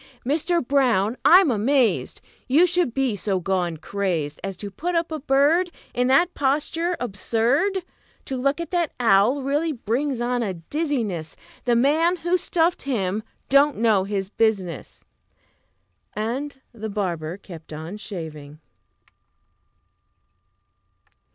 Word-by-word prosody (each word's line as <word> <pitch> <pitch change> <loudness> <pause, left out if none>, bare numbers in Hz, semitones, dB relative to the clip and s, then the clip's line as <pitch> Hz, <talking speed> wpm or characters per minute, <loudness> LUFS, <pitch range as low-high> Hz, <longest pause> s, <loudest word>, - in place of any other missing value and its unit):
Mister 325 +5 +1
Brown, 240 -6 +2
I'm 360 -4 +7
amazed 240 +3 +1 0.3
You 295 +7 +5
should 355 -6 +1
be 260 -3 0
so 195 -1 -1
gone 180 -2 -1
crazed 165 -5 -2
As 195 -2 -4
to 205 +1 -7
put 350 - -3
up 335 -1 0
a 315 - -3
bird 295 +6 +3 0.2
In 250 0 +1
that 340 +7 +3
posture 305 +5 0
absurd! 245 - 0 0.4
To 265 - -4
look 275 +4 0
at 335 -2 -5
that 345 -4 0
owl 230 +4 +3
really 295 +4 0
brings 255 +1 -2
on 245 0 0
a 195 -5 -2
dizziness; 210 - -3 0.3
The 240 -1 +3
man 310 +8 +3
who 350 +1 0
stuffed 345 -1 +1
him 215 -6 -1 0.3
don't 280 +2 +4
half 225 - -4
know 215 -5 +4
his 195 -1 -3
business!" 195 - -1 1.1
And 265 +7 -3
the 220 -1 -6
barber 175 -5 -3
kept 170 -6 -12
on 160 +6 -6
shaving. 155 -8 -8
245 Hz, 130 wpm, -23 LUFS, 195-295 Hz, 1.1 s, I'm